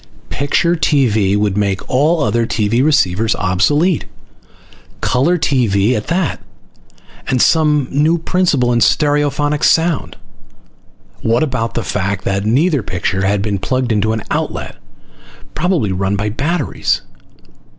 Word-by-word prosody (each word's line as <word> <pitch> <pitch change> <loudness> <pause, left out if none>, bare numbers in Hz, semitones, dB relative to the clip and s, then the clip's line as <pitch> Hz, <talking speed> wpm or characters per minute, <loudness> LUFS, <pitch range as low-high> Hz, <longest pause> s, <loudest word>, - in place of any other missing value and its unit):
Picture 170 +4 0
TV 110 - +1
would 105 -2 0
make 100 -2 -1
all 150 +5 +2
other 115 +2 0
TV 115 +3 0
receivers 115 - +2
obsolete! 145 - +1
Full - - -31 0.5
color 145 +8 +1
TV 120 - +1
at 105 - -4
that! 170 -4 -1 0.9
And - - -1
with 125 - +3
some 150 -4 +2
new 155 +4 +2
principle 160 -8 +1
in 120 - +2
stereophonic 145 +2 +1
sound! 165 -1 +1 1.0
What 115 +5 +1
about 125 -6 -3
the 115 - -2
fact 95 +1 -2
that 100 +1 -1
neither 145 +5 +2
picture 95 0 -2
had 100 0 0
been 100 -2 -2
plugged 130 +4 -1
into 110 0 +1
an 110 -2 -3
outlet? - - -3 0.8
Probably 160 - 0
run 95 +2 -1
by 105 +1 -2
batteries. 145 +8 -1
125 Hz, 130 wpm, -16 LUFS, 105-150 Hz, 1.0 s, with